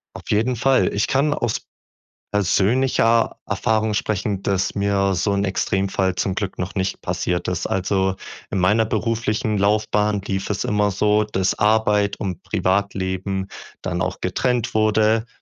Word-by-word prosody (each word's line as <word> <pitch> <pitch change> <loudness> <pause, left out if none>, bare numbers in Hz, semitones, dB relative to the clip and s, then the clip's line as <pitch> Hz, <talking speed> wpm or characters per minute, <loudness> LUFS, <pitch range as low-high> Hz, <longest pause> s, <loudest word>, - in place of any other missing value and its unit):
Auf - - -10
jeden 115 +4 +1
Fall. 125 -6 +2
Ich 100 - 0
kann 145 +2 +2
aus 120 -6 -2 0.7
persönlicher 115 +4 +2
Erfahrung 110 0 0
sprechen, 105 -1 -1
dass 100 -1 0
mir 100 -1 +1
so 100 +3 0
'n 100 0 0
Extremfall 95 -1 0
zum 95 - -1
Glück 100 -1 -4
noch 90 +1 -4
nicht 95 0 -2
passiert 90 0 -2
ist. 90 -1 -1
Also, 95 0 0 0.4
in - - -1
meiner 105 +5 +3
beruflichen 110 -2 -1
Laufbahn 105 0 +1
lief 95 0 -3
es 105 - -2
immer 105 -1 +1
so, 105 +2 +2
dass 95 -2 -1
Arbeit 105 -1 +2
und 95 -4 -4
Privatleben 95 0 -1 0.3
dann - - -2
auch - - -2
getrennt 125 -3 0
wurde, 110 +1 +2
100 Hz, 145 wpm, -21 LUFS, 95-110 Hz, 0.7 s, meiner